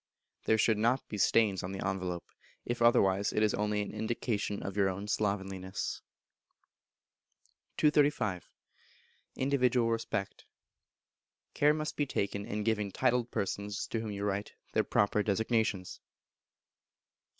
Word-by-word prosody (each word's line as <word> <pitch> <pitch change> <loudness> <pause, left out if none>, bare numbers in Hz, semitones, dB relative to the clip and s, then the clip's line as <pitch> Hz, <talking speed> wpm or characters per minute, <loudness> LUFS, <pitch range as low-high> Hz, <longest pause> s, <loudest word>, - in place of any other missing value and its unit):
There 110 - +4
should 110 -1 +3
not 120 +4 +1
be 105 - -4
stains 105 -2 +3
on 90 +2 -5
the 95 - -3
envelope; 90 -2 -3 0.4
if 120 0 -3
otherwise, 100 -4 +4
it 105 - +1
is 105 - +3
only 105 0 0
an - - -7
indication 110 -2 -2
of 100 - -5
your 100 -2 +3
own 100 +2 -5
slovenliness. 95 -3 -2 1.8
235. 145 - +2 0.9
Individual 125 -3 +2
Respect. 115 -3 -3 1.1
Care 150 +1 +4
must 155 0 -3
be 145 - +1
taken 100 -3 -2
in 105 +1 -2
giving 105 -2 0
titled 125 +1 +1
persons, 100 0 -3
to 115 - -1
whom 110 -1 -4
you 100 -1 -4
write, 100 0 -2 0.2
their - - +3
proper 100 +1 +2
designations. 105 -2 0
105 Hz, 130 wpm, -31 LUFS, 100-115 Hz, 1.8 s, There